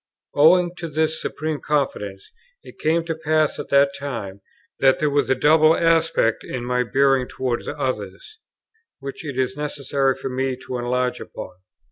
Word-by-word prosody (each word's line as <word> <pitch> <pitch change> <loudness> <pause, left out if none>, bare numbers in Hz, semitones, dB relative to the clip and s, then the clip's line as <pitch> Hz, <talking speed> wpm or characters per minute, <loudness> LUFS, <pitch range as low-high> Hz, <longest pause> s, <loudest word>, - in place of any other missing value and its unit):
Owing 175 +4 +5
to 170 - -5
this 155 +1 0
supreme 155 -1 -3
confidence, 105 -10 -2 0.3
it - - -14
came 165 +2 +1
to 165 - -2
pass 155 -1 0
at - - -6
that 140 0 +4
time, 110 -9 -6 0.4
that 135 -1 +5
there 150 -1 0
was 145 0 +1
a 130 - +4
double 155 +4 +5
aspect 165 -8 +2
in 125 -2 -5
my 125 0 +1
bearing 135 +1 +2
towards 125 -2 -3
others, 130 - -4 0.6
which 140 +2 -8
it 140 -4 -6
is 130 0 0
necessary 140 -2 -1
for - - -5
me 130 0 -1
to 125 - -4
enlarge 125 +1 -1
upon. - - -8
140 Hz, 160 wpm, -22 LUFS, 125-155 Hz, 0.6 s, Owing